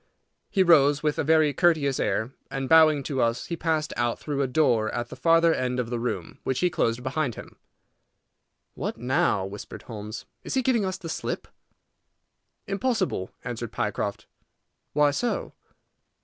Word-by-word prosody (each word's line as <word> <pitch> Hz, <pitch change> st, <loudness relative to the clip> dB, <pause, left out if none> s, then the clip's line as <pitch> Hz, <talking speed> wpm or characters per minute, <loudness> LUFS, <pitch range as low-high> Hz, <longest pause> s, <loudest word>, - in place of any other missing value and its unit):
He 195 Hz, -, +3 dB
rose 145 Hz, -4 st, +5 dB
with 150 Hz, -1 st, 0 dB
a -, -, +2 dB
very 155 Hz, -1 st, +4 dB
courteous 150 Hz, -4 st, +2 dB
air, 110 Hz, +4 st, 0 dB, 0.2 s
and, 135 Hz, -1 st, -3 dB
bowing 155 Hz, -2 st, +6 dB
to 135 Hz, -2 st, -1 dB
us, 115 Hz, 0 st, 0 dB
he 170 Hz, -, -3 dB
passed 160 Hz, -2 st, -1 dB
out 120 Hz, -1 st, 0 dB
through 145 Hz, -2 st, -3 dB
a 135 Hz, -, +1 dB
door 125 Hz, -6 st, +2 dB
at 120 Hz, 0 st, -3 dB
the -, -, -8 dB
farther 165 Hz, 0 st, +4 dB
end 125 Hz, -2 st, -1 dB
of 120 Hz, -1 st, -3 dB
the 120 Hz, -, -1 dB
room, 120 Hz, +1 st, -4 dB
which 130 Hz, -, -1 dB
he 180 Hz, -1 st, +2 dB
closed 115 Hz, -3 st, 0 dB
behind 130 Hz, -2 st, -1 dB
him. -, -, -11 dB, 1.2 s
"What -, -, -4 dB
now?" 120 Hz, -5 st, +1 dB
whispered 100 Hz, +2 st, -8 dB
Holmes. 105 Hz, -1 st, -7 dB, 0.2 s
"Is -, -, -4 dB
he 260 Hz, -, +2 dB
giving 235 Hz, -5 st, +2 dB
us 185 Hz, 0 st, -2 dB
the 165 Hz, -, -8 dB
slip?" 160 Hz, -, -4 dB, 1.2 s
"Impossible," 195 Hz, -, -1 dB
answered 120 Hz, -1 st, -5 dB
Pycroft. 105 Hz, -3 st, -2 dB, 0.7 s
"Why 150 Hz, 0 st, +4 dB
so?" 240 Hz, +11 st, -2 dB
140 Hz, 165 wpm, -26 LUFS, 120-160 Hz, 1.2 s, bowing